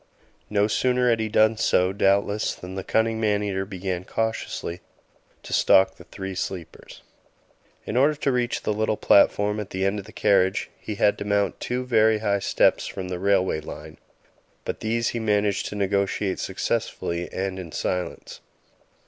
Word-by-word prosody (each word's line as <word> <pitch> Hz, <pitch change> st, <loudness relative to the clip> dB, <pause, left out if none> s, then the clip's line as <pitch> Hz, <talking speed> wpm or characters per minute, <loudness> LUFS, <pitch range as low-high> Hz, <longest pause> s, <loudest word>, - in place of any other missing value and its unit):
No 105 Hz, -1 st, +2 dB
sooner 125 Hz, +3 st, +2 dB
had 115 Hz, -, +1 dB
he 110 Hz, -1 st, -1 dB
done 110 Hz, +1 st, +3 dB
so, 90 Hz, -2 st, +2 dB
doubtless, 100 Hz, +1 st, +1 dB
than 90 Hz, +1 st, -9 dB
the 95 Hz, 0 st, -4 dB
cunning 110 Hz, +2 st, +1 dB
man 105 Hz, -1 st, +1 dB
eater 95 Hz, -1 st, -2 dB
began 95 Hz, -2 st, -4 dB
cautiously 110 Hz, -5 st, -3 dB, 0.6 s
to -, -, -7 dB
stalk 95 Hz, -, +5 dB
the -, -, -14 dB
three 95 Hz, 0 st, -6 dB
sleepers. 90 Hz, -2 st, -7 dB, 0.8 s
In -, -, -4 dB
order 140 Hz, +4 st, +4 dB
to 145 Hz, -1 st, 0 dB
reach 125 Hz, -1 st, -1 dB
the 105 Hz, -, 0 dB
little 110 Hz, 0 st, 0 dB
platform 105 Hz, +1 st, +4 dB
at 105 Hz, -, -5 dB
the 95 Hz, 0 st, -2 dB
end 100 Hz, +2 st, 0 dB
of 100 Hz, -, -9 dB
the -, -, -12 dB
carriage, 95 Hz, -2 st, +2 dB
he 105 Hz, -, -5 dB
had 105 Hz, +1 st, +2 dB
to -, -, -3 dB
mount 100 Hz, -2 st, 0 dB
two 125 Hz, +1 st, -3 dB
very 110 Hz, -3 st, +4 dB
high 100 Hz, -2 st, 0 dB
steps -, -, +2 dB
from 95 Hz, -1 st, -6 dB
the 90 Hz, -1 st, -4 dB
railway 95 Hz, -4 st, +1 dB
line, 75 Hz, 0 st, -10 dB, 0.7 s
but -, -, -4 dB
these 115 Hz, +1 st, 0 dB
he 120 Hz, -, -3 dB
managed 105 Hz, -2 st, +1 dB
to -, -, -6 dB
negotiate 100 Hz, -1 st, 0 dB
successfully 85 Hz, +1 st, -2 dB
and 95 Hz, 0 st, -3 dB
in 85 Hz, -3 st, -8 dB
silence. 90 Hz, +2 st, -4 dB
100 Hz, 170 wpm, -24 LUFS, 95-110 Hz, 0.8 s, stalk